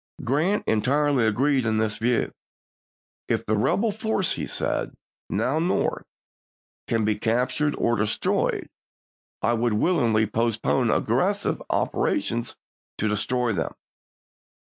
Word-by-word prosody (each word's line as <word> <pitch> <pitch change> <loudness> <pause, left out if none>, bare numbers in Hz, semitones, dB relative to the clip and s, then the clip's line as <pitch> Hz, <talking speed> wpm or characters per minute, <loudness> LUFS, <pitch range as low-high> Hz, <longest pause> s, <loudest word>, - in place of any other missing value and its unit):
Grant 160 - +1
entirely 135 +2 +2
agreed 135 +5 +2
in 110 -1 +1
this 110 -1 0
view. 120 +1 +1 1.0
"If - - -1
the 110 - +1
rebel 205 - +1
force," 215 -3 -1
he - - -3
said, - - -1 0.2
" - - -78
now 125 +9 0
North, 170 +3 0 0.8
can 115 -2 +1
be 110 - +2
cap 115 +4 0
tured 150 -1 0
or 120 - +2
destroyed, 105 0 0 0.8
I 120 - +3
would 120 -1 +1
willingly 115 -4 +2
postpone 110 -7 0
aggressive - - +1
operations 115 +1 0 0.4
to 110 - 0
destroy 115 +3 0
them." - - -2
120 Hz, 120 wpm, -25 LUFS, 110-145 Hz, 1.0 s, I